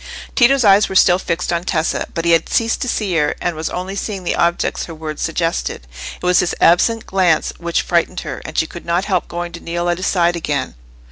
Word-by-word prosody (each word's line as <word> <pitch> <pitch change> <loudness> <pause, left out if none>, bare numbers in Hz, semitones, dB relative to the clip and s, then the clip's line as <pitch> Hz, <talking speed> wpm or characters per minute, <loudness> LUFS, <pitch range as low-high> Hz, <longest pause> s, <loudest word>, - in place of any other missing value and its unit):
Tito's 265 +1 +4
eyes 200 +1 +5
were 190 - -5
still 180 -1 +5
fixed 175 -1 -2
on 170 0 -1
Tessa; 165 -3 -1
but 165 - -2
he 170 - +3
had 165 - +3
ceased 230 0 +1
to - - -1
see 205 -6 -1
her, 150 -2 +1
and 175 -2 -2
was 155 +1 -3
only 185 +2 -5
seeing 200 -2 -4
the - - -1
objects 170 0 0
her 165 - -9
words 155 -1 -6
suggested. 165 - -2 0.3
It - - -7
was 180 0 +4
this 175 - 0
absent 220 +7 +3
glance 180 -5 +1
which 170 -1 -1
frightened 175 +1 0
her, 150 -5 -6
and 155 - -8
she - - +3
could 170 +2 -10
not 175 +3 0
help 185 -4 0
going 175 0 -5
to 170 - -8
kneel 175 +1 -3
at 175 - 0
his 185 - -2
side 175 -2 +2
again. 145 -5 -2
175 Hz, 230 wpm, -18 LUFS, 165-185 Hz, 0.3 s, eyes